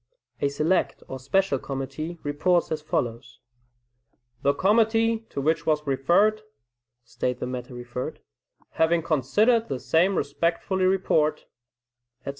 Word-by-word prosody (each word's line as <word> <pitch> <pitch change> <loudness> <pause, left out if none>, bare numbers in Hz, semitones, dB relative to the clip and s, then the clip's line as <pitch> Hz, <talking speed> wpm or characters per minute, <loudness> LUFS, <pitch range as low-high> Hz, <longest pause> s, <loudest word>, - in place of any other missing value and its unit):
A - - +3
select 155 +6 0
or 130 - -6
special 140 +2 +1
committee 135 +6 -5
reports 170 +5 +1
as 155 -1 -2
follows: 120 -4 -3 1.0
"The 140 +1 +2
committee 225 +2 +2
to - - -5
which 160 +3 0
was 150 -1 +1
referred 175 +11 +2 0.6
[state 120 +1 -3
the - - -3
matter 125 0 -6
referred] 120 +1 -6 0.5
having 165 +1 +2
considered 210 - +2
the 130 - -3
same 175 +8 +2
respectfully 170 +5 0
report," 185 -5 +1 0.8
etc. - - -7
155 Hz, 120 wpm, -25 LUFS, 135-190 Hz, 1.0 s, A